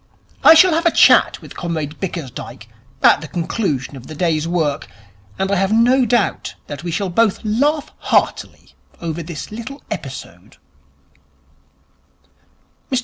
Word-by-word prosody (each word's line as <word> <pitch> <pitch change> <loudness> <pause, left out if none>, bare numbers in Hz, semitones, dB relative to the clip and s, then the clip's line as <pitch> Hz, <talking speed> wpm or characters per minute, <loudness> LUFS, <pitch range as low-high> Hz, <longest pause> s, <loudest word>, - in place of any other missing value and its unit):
I 325 - +9
shall 365 +1 +6
have 335 +2 +2
a - - +4
chat - - +4
with - - -12
Comrade 160 -3 -4
Bickersdyke 155 -10 -7 0.4
at - - +5
the 155 - -7
conclusion 160 - -3
of 130 -2 -11
the 155 - -9
day's 160 -1 0
work, 160 -4 -1 0.5
and 190 +1 -1
I 200 - +2
have 195 +2 0
no 245 +4 +4
doubt 240 +2 0
that 145 +1 -8
we 175 - -4
shall 190 +2 -2
both 220 +2 +2
laugh 285 +8 0
heartily - - -1 0.3
over 170 0 -4
this 165 +1 -8
little 250 +6 -8
episode.' 130 - -8
175 Hz, 140 wpm, -19 LUFS, 155-230 Hz, 0.5 s, I